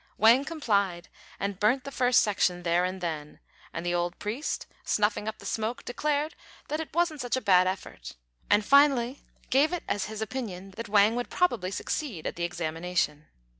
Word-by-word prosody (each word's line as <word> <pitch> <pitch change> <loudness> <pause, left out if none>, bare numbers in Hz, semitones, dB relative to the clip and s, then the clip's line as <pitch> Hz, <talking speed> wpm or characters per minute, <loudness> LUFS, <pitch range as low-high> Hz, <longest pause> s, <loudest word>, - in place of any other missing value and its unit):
Wang 235 +6 +6
complied, 200 - 0 0.3
and 200 -1 -3
burnt 245 +5 +3
the 275 - -7
first 250 -2 +4
section 180 -4 +1
there 175 +1 +2
and 185 +1 -4
then; 155 -4 -4 0.3
and 165 +1 -5
the 175 - 0
old 175 0 -1
priest, 230 +9 -3 0.2
snuffing 210 0 +1
up 220 - -3
the - - -13
smoke, 225 +2 -3
declared 295 +4 -1 0.4
that 305 - -1
it 320 - -5
wasn't 335 -4 +1
such 245 +1 -1
a - - +1
bad 185 -6 +4
effort, 185 - -5 0.3
and 205 0 +4
finally 275 -2 +4 0.3
gave 280 +5 +4
it 355 -2 -3
as 200 -2 -1
his 215 +1 -6
opinion 210 -5 -5
that 230 +3 -7
Wang 210 +2 +5
would 245 0 -3
probably 240 - +1
succeed 200 - -4
at - - -3
the 170 - -4
examination. 165 -2 -2
210 Hz, 180 wpm, -28 LUFS, 180-260 Hz, 0.4 s, Wang